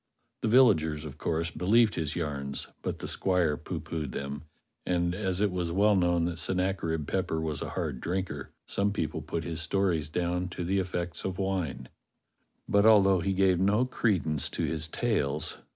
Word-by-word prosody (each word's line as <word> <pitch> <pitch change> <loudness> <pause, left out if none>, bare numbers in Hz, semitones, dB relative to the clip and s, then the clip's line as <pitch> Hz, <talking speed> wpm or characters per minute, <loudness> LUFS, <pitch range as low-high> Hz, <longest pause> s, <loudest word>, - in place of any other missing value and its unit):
The - - 0
villagers, 80 - +4
of 75 0 -9
course, 80 +1 -1
believed 105 +6 +3
his 80 -3 -2
yarns, 70 -4 -3
but - - -3
the - - -6
squire 90 -5 +1
poohpoohed 75 -1 -5
them, 70 +2 -5 0.4
and, 85 -1 0
as 95 -1 -1
it 105 -2 +2
was 90 -2 -2
well 100 +4 +4
known 85 -2 +2
that 85 -1 -2
Sennacherib 90 -3 0
Pepper 90 -4 -1
was 80 -3 -3
a - - -3
hard 80 -8 -3
drinker, 95 +2 -3 0.2
some 100 +1 0
people 80 -6 -2
put 85 - -4
his 80 -1 -3
stories 85 -3 0
down 90 +2 -1
to 90 0 -5
the 95 +3 +1
effects 90 -2 -3
of 95 -1 -3
wine. 90 -10 -2 0.8
But 100 +1 +4
although 100 -4 +6
he 95 +3 0
gave 95 -2 +3
no 105 +6 +3
credence 90 - +1
to - - -3
his 80 0 -1
tales. 80 - -1
90 Hz, 170 wpm, -29 LUFS, 80-95 Hz, 0.8 s, although